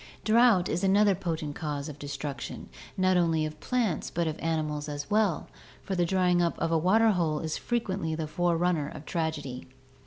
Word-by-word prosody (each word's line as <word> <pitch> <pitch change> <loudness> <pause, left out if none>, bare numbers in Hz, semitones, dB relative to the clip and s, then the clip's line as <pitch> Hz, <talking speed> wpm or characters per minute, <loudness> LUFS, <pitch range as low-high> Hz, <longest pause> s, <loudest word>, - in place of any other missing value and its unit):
Drought 220 -5 +5
is 175 +4 -2
another 200 +1 +4
potent 165 -5 -3
cause 145 -2 -4
of 150 -2 -8
destruction, 140 -2 -6 0.3
not 185 -1 +3
only 165 -3 +2
of 155 0 -7
plants 230 - -1
but 170 0 -1
of 160 0 -3
animals 155 -2 -2
as 145 +2 -6
well, 210 -6 +2 0.4
for 195 - -4
the 175 -2 +1
drying 180 -1 +3
up 170 -1 0
of 165 - -1
a - - +3
waterhole 180 -4 +3
is 160 -1 -2
frequently 195 -9 -2
the 160 0 -3
forerunner 170 -2 0
of 150 0 -10
tragedy. 155 -6 -3
165 Hz, 175 wpm, -28 LUFS, 155-185 Hz, 0.4 s, Drought